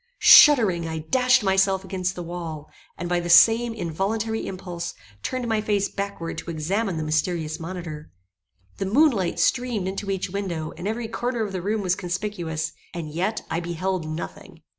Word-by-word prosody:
Shuddering, 215 - +7
I 160 0 -4
dashed 250 +10 +3
myself 190 0 +2
against 185 -1 -2
the 175 - -5
wall, 165 -3 -7 0.3
and 175 - -4
by 175 0 +1
the 175 0 -4
same 225 +7 +6
involuntary 220 +4 -2
impulse, 180 -2 -6 0.3
turned 255 - -3
my 220 -2 +1
face 205 -2 0
backward 200 -4 -4
to - - -8
examine 180 +4 -1
the 155 - -2
mysterious 155 0 -1
monitor. 165 -3 -7 0.7
The 195 - -2
moon 290 +9 +5
light 190 -7 -2
streamed 245 -7 +1
into 195 +1 -4
each 190 -2 -2
window, 175 -5 -3
and 175 +4 -5
every 225 +2 -2
corner 240 +1 -2
of 205 - -4
the 185 -2 -4
room 210 +3 -1
was 180 -2 +1
conspicuous, 180 -4 -3 0.2
and 160 -3 -5
yet 190 +8 -2
I 165 - 0
beheld 175 0 -3
nothing! 155 +2 -7
185 Hz, 170 wpm, -24 LUFS, 170-215 Hz, 0.7 s, Shuddering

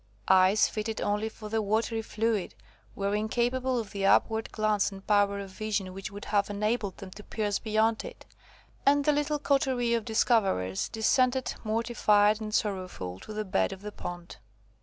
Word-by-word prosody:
Eyes 190 +2 +5
fitted 220 0 -4
only 210 +2 -1
for 215 -1 -10
the 220 0 0
watery 225 +2 0
fluid, 220 -2 -1 0.4
were 200 0 -1
incapable 245 +4 0
of 220 -4 -4
the 200 -1 -4
upward 220 +3 +3
glance 215 -2 +1
and 195 0 -11
power 205 -1 +3
of 200 -1 -7
vision 200 -2 -3
which 195 +3 -6
would 205 0 -9
have 205 -1 +1
enabled 210 -1 -1
them 190 -1 -9
to 210 - -11
pierce 205 -2 -2
beyond 220 0 +1
it; - - -10 0.6
and 285 0 +3
the 300 - +5
little 295 +1 0
coterie 265 -4 +1
of 230 -1 +1
discoverers 200 - +1
descended, 255 +3 +1
mortified 215 -2 +2
and 215 0 -3
sorrowful, 185 - -3
to - - -10
the 215 0 -3
bed 95 - +1
of 190 - -9
the 210 - -5
pond. 175 -3 -8
215 Hz, 170 wpm, -28 LUFS, 200-225 Hz, 0.6 s, Eyes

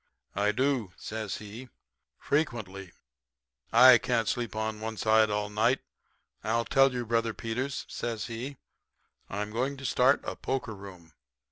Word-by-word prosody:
"'I 105 +2 +2
do,' 130 -6 0
says 110 -2 -4
he, 110 +5 -9 0.5
'frequently. 110 - -2 0.8
I 125 +1 +9
can't 115 -3 0
sleep 120 -2 -2
on 110 0 -2
one 110 0 -5
side 110 0 +4
all 105 0 -2
night. 115 +5 +2 0.6
I'll 115 +2 0
tell 135 -1 +4
you, 125 -1 -3
Brother 115 0 0
Peters,' 125 +4 -3
says 115 -3 -4
he, 125 +4 -6 0.7
'I'm 105 +1 -3
going 130 +5 -1
to 135 - -8
start 130 +3 +3
a - - -4
poker 130 -4 -3
room. 95 -5 -12
115 Hz, 140 wpm, -29 LUFS, 105-125 Hz, 0.8 s, I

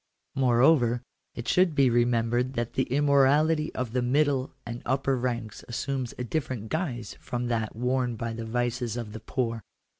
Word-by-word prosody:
Moreover, 125 -1 +3 0.3
it 120 - -6
should 180 -4 +3
be 140 -2 +5
remembered 120 +1 +2
that 120 -2 -2
the 130 - +1
immorality 145 +3 +3
of 125 -3 -2
the 125 +1 0
middle 135 +1 +1
and 120 +1 -6
upper 135 +1 +1
ranks 120 -3 -3
assumes 130 +1 -3
a 125 - -3
different 125 -5 -3
guise 145 - -3
from 120 0 -3
that 110 -3 -1
worn 125 0 0
by 115 +1 -4
the 115 0 -5
vices 120 0 -1
of 110 -3 -5
the 110 - -6
poor. 115 -4 -2
125 Hz, 160 wpm, -27 LUFS, 120-135 Hz, 0.3 s, be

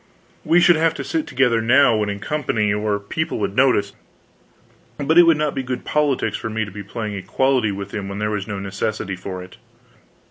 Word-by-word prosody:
We 165 +3 +4
should 175 -1 +5
have 165 0 +2
to 140 - -5
sit 150 +4 -2
together 125 -4 +2
now 125 +1 +4
when 105 -1 0
in 100 - -3
company, 110 -6 -1
or 105 0 0
people 155 +11 -3
would 100 -2 -2
notice; 125 -6 +2 1.0
but 155 +4 +3
it 175 - +7
would 165 -2 +5
not 150 -1 0
be 135 - -2
good 125 -1 -5
politics 150 -3 0
for 110 - -5
me 110 0 -2
to 100 - -10
be 105 - -7
playing 105 +1 -5
equality 125 +3 0
with 100 0 -7
him 100 -2 -4
when 100 - -5
there 105 +1 -1
was 100 -2 -3
no 105 - -4
necessity 100 0 -3
for 95 0 -7
it. 90 - -14
110 Hz, 210 wpm, -21 LUFS, 100-140 Hz, 1.0 s, it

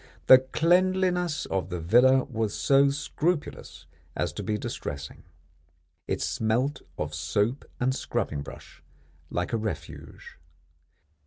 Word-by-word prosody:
The 130 - +9
cleanliness 180 +3 +1
of 95 -1 -2
the 90 -1 -4
villa 125 +10 +5
was 110 -4 -3
so 140 0 +4
scrupulous 145 +3 -3 0.3
as - - -1
to - - -5
be 105 -1 -1
distressing. 70 -7 -6 0.9
It - - -1
smelt 125 +6 0 0.2
of 75 0 -3
soap 105 - -1
and 130 +2 +1
scrubbing 75 - -2
brush 70 -1 -12 0.5
like 90 +5 -3
a - - +3
Refuge. 110 -8 -7
125 Hz, 115 wpm, -27 LUFS, 95-145 Hz, 0.9 s, The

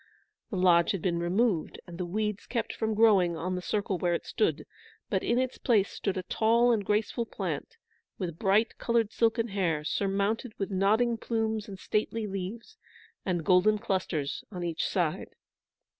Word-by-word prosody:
The 200 - -3
lodge 175 -1 +4
had 190 - -4
been 170 -2 +1
removed, 180 +1 0
and 175 -1 -10
the 180 - -2
weeds 210 +2 -2
kept 235 -2 -2
from 220 -1 -1
growing 195 -6 +4
on 185 +3 -2
the 180 - -2
circle 200 -1 -1
where 175 -1 +1
it - - -5
stood, 425 - 0 0.5
but - - +1
in 235 - +1
its 255 0 -1
place 210 -6 +2
stood 195 -2 -2
a 185 - -2
tall 230 +5 +3
and 220 -3 +1
graceful 215 +3 0
plant, 460 - -4 0.4
with 170 -4 -4
bright 210 +3 +2
coloured 230 -2 +1
silken 230 +1 +1
hair, 175 -6 0
surmounted 200 +7 -1
with 195 0 -3
nodding 215 +5 +2
plumes 220 -1 -2
and 195 -2 -8
stately 215 +3 -1
leaves, 205 - -6 0.5
and 175 -4 -1
golden 195 +3 +4
clusters 185 -9 -2
on 180 -3 -5
each 170 -1 -1
side. 170 -5 -2
200 Hz, 170 wpm, -29 LUFS, 180-225 Hz, 0.5 s, lodge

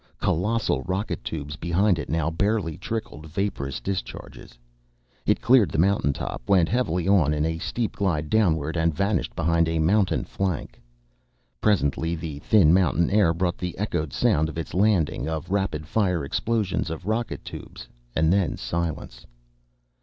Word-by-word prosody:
Colossal 110 +7 0
rocket 95 +3 -2
tubes 75 -2 -5
behind 90 +2 +1
it 75 - -5
now 80 0 0
barely 100 -2 0
trickled 95 -6 -5
vaporous 80 -5 -3
discharges. 95 -9 -6 0.7
It - - +2
cleared 120 -5 +5
the - - -3
mountain 95 -3 +3
top, 70 - -5
went 90 -4 +4
heavily 90 -7 0
on 80 -7 +4
in 75 +1 0
a 80 0 -2
steep 115 +5 -3
glide 80 -7 0
downward, 80 -7 +1
and 80 -2 +1
vanished 100 0 0
behind 85 0 +2
a 80 - 0
mountain 95 +5 +2
flank. 90 -11 -3 0.8
Presently 85 -4 +1
the 80 -3 -6
thin 85 -1 +5
mountain 90 -2 +2
air 100 -5 +4
brought 85 +1 -1
the 90 -2 -4
echoed 80 -8 -2
sound 80 +1 +2
of 80 - -8
its 80 - -5
landing, 90 - +1
of 80 +2 -4
rapid 95 -7 -1
fire 90 -5 0
explosions 105 +2 -1
of 80 -1 -6
rocket 110 +3 -2
tubes, - - -9 0.3
and 80 +2 +3
then 95 -5 +1
silence. 80 -7 -4
85 Hz, 155 wpm, -25 LUFS, 80-100 Hz, 0.8 s, cleared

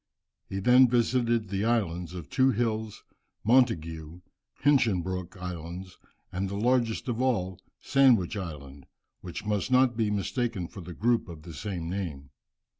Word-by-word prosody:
He 95 - -4
then 125 +5 +6
visited 120 -2 +1
the 100 0 -1
Islands 90 -7 0
of 85 -5 -7
Two 130 - +3
Hills, 110 -2 -1 0.4
Montagu 85 -9 +1 0.4
and 145 -1 +6
Hinchinbrook 95 -3 -2
Islands, 90 0 -7 0.3
and 95 +2 -2
the 100 - -4
largest 120 +1 +1
of 120 -1 -1
all, 95 -8 0 0.2
Sandwich 125 -9 +4
Island, 70 -7 -7 0.3
which - - -7
must 105 +1 -1
not 130 -1 +4
be 110 -2 +1
mistaken 105 -1 -1
for 95 - -10
the 85 0 -9
group 115 -1 +1
of 80 -3 -10
the 85 -1 -9
same 90 -1 -4
name. 80 -7 -5
100 Hz, 145 wpm, -28 LUFS, 90-120 Hz, 0.4 s, then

